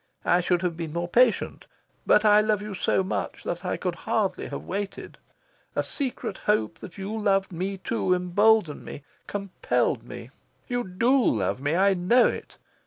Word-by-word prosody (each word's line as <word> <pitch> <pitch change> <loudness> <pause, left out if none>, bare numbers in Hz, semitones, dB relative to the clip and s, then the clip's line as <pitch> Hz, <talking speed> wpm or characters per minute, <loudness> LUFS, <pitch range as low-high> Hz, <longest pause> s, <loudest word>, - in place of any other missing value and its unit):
I 175 - +4
should 175 0 +1
have 175 -2 -1
been 165 -2 -5
more 170 +1 -2
patient. 240 +4 +2 0.4
But 210 - +5
I 210 0 +7
love 215 -1 0
you 210 -1 -6
so 190 0 +1
much 185 - -4
that - - -4
I - - -2
could - - -2
hardly - - -1
have - - -6
waited. 200 0 -5 0.6
A - - +1
secret 255 -8 -3
hope 110 - 0
that 180 - -10
you 200 +3 -4
loved 195 -3 +1
me 190 +3 -3
too 185 -1 0
emboldened 180 -1 +2
me, 140 - -9 0.2
compelled 200 -2 -1
me. - - -10 0.4
You 245 -1 -1
DO 235 +8 +2
love 110 +4 -1
me. 145 +3 0
I 195 +2 +4
know 195 +7 +4
it. - - -3
195 Hz, 175 wpm, -26 LUFS, 175-215 Hz, 0.6 s, I